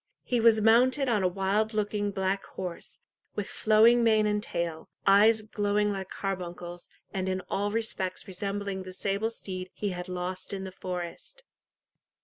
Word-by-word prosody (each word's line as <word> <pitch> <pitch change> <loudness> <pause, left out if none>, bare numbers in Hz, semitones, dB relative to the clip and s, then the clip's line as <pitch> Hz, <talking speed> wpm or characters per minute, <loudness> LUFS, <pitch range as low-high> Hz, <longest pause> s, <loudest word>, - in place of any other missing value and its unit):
He 245 - 0
was 225 -1 +5
mounted 255 +5 +5
on 225 -5 +2
a 185 - +3
wild 200 +4 0
looking 205 -1 0
black 195 0 -1
horse, 180 -2 -6 0.3
with 205 -1 -2
flowing 225 +2 +5
mane 220 -2 +4
and 210 0 +1
tail, 170 -5 -3 0.2
eyes 215 +3 +6
glowing 210 0 0
like 190 -2 -4
carbuncles, 175 -2 -5 0.2
and 190 -1 -1
in 185 0 -1
all 205 +1 0
respects 210 -4 -2
resembling 200 +1 -3
the 185 0 -8
sable 200 +3 -1
steed 185 -5 -6
he 205 - -2
had 180 0 -5
lost 180 +1 -4
in 190 -1 -4
the 190 - -6
forest. 180 - -6
200 Hz, 155 wpm, -29 LUFS, 185-215 Hz, 0.3 s, eyes